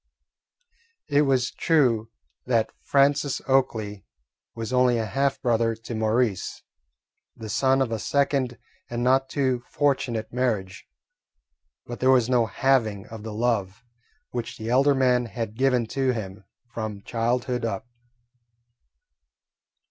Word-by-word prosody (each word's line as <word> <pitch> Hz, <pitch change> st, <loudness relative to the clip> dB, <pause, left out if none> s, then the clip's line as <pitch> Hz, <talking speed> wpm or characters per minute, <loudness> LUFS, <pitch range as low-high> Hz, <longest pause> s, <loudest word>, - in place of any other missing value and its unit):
It 145 Hz, 0 st, +4 dB
was 130 Hz, -2 st, +2 dB
true 120 Hz, -9 st, +2 dB, 0.4 s
that 115 Hz, -3 st, +1 dB
Francis 140 Hz, 0 st, +2 dB
Oakley 110 Hz, -7 st, 0 dB, 0.5 s
was 115 Hz, +2 st, -5 dB
only 125 Hz, -1 st, +4 dB
a 115 Hz, -, -1 dB
half 135 Hz, +4 st, 0 dB
brother 115 Hz, -2 st, +2 dB
to 115 Hz, +2 st, -8 dB
Maurice, 110 Hz, -2 st, 0 dB, 0.7 s
the 110 Hz, -1 st, -8 dB
son 135 Hz, +4 st, +3 dB
of 120 Hz, -, -5 dB
a 110 Hz, -, -2 dB
second 135 Hz, +1 st, 0 dB, 0.3 s
and 120 Hz, 0 st, -2 dB
not 135 Hz, +1 st, +3 dB
too 130 Hz, -4 st, 0 dB
fortunate 120 Hz, -6 st, -1 dB
marriage, 110 Hz, -7 st, -2 dB, 1.0 s
but 120 Hz, -, -7 dB
there 130 Hz, -, +3 dB
was 125 Hz, -2 st, +4 dB
no 120 Hz, -3 st, +3 dB
halving 110 Hz, -7 st, +1 dB
of 110 Hz, -1 st, -8 dB
the 110 Hz, +1 st, -6 dB
love 105 Hz, -3 st, -1 dB, 0.5 s
which 120 Hz, -2 st, -5 dB
the 110 Hz, +1 st, -4 dB
elder 140 Hz, +3 st, +4 dB
man 125 Hz, -2 st, +2 dB
had 110 Hz, 0 st, -5 dB
given 125 Hz, -1 st, +2 dB
to 135 Hz, -2 st, +1 dB
him 100 Hz, -3 st, -7 dB, 0.3 s
from 110 Hz, -3 st, -5 dB
childhood 120 Hz, +1 st, -1 dB
up. 115 Hz, -1 st, -3 dB
120 Hz, 125 wpm, -25 LUFS, 110-130 Hz, 1.0 s, It